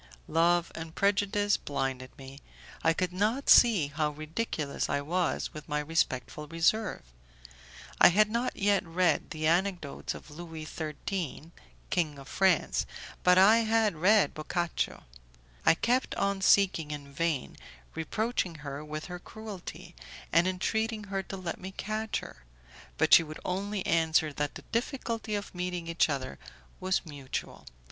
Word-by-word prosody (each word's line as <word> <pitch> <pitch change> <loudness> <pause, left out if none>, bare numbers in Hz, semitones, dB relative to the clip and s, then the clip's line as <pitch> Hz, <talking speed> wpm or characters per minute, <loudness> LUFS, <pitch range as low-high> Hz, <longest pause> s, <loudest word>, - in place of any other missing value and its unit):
Love 170 +1 +2
and 160 0 -8
prejudice 205 +1 +2
blinded 130 -2 -3
me, 135 0 -11 0.4
I 165 - +5
could 180 +2 -1
not 215 +9 +1
see 205 -12 +6
how 150 +1 0
ridiculous 155 0 -3
I 140 - +1
was 175 +4 -1
with 150 0 -9
my 150 - 0
respectful 150 -2 -1
reserve. 170 +7 +1 1.0
I - - +10
had 210 +4 +5
not 235 +2 -1
yet 200 -1 +2
read 170 -2 +1
the 155 -1 -4
anecdotes 175 -2 0
of 150 - -12
Louis 160 0 -8
XIII, 160 +1 -5 0.4
king 155 -5 0
of 135 -1 -11
France, 190 -4 +2 0.3
but 180 0 +5
I 200 +4 +7
had 225 -2 +2
read 190 0 +4
Boccacio. 170 +2 -2 0.6
I - - +7
kept 245 +8 0
on 200 -1 0
seeking 190 -6 +4
in 145 -2 -7
vain, 160 -3 -1 0.4
reproaching 185 +2 -1
her 140 +1 -5
with 155 0 -6
her 180 -1 -7
cruelty, 215 -1 -9 0.4
and 170 +2 +5
entreating 220 +4 -1
her 195 - +1
to 195 0 -7
let 180 -3 -5
me 190 +1 -7
catch 215 +1 -2
her; - - -12 0.5
but - - +3
she - - +10
would 155 -1 -8
only 195 +2 -2
answer 160 -2 +2
that 145 0 -2
the - - -9
difficulty 230 -3 -2
of 205 0 -5
meeting 180 -1 -3
each 165 0 +2
other 130 - -3 0.4
was 185 0 0
mutual. 145 -4 -6
175 Hz, 145 wpm, -29 LUFS, 155-200 Hz, 1.0 s, I